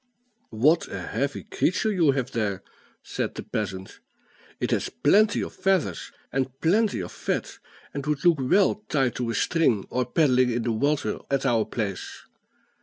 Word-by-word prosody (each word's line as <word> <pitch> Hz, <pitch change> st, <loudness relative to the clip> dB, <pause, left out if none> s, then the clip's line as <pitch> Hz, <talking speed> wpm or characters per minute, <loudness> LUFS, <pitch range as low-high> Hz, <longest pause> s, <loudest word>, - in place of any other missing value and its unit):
"What 150 Hz, +10 st, +3 dB
a 100 Hz, -, -6 dB
heavy 130 Hz, +10 st, -3 dB
creature 200 Hz, +5 st, 0 dB
you 175 Hz, -7 st, +3 dB
have 130 Hz, -2 st, -2 dB
there!" 100 Hz, -5 st, -2 dB, 0.4 s
said -, -, -3 dB
the -, -, -6 dB
peasant; 95 Hz, -3 st, -5 dB, 0.6 s
"it -, -, -1 dB
has -, -, 0 dB
plenty 205 Hz, +8 st, +3 dB
of -, -, -6 dB
feathers 190 Hz, -2 st, 0 dB, 0.2 s
and 135 Hz, 0 st, -2 dB
plenty 205 Hz, -, +2 dB
of 90 Hz, -, -6 dB
fat, -, -, -3 dB, 0.3 s
and 140 Hz, -, -4 dB
would 150 Hz, 0 st, -1 dB
look 170 Hz, -4 st, +5 dB
well 195 Hz, +9 st, +2 dB
tied 135 Hz, -5 st, +1 dB
to 120 Hz, -2 st, -2 dB
a 115 Hz, -, -2 dB
string, 125 Hz, -, +2 dB
or 125 Hz, -1 st, 0 dB
paddling 130 Hz, -3 st, +3 dB
in 120 Hz, 0 st, -1 dB
the 120 Hz, -, 0 dB
water 140 Hz, +6 st, 0 dB
at 140 Hz, 0 st, 0 dB
our 115 Hz, -4 st, +2 dB
place. 100 Hz, -5 st, -5 dB
135 Hz, 165 wpm, -25 LUFS, 115-165 Hz, 0.6 s, look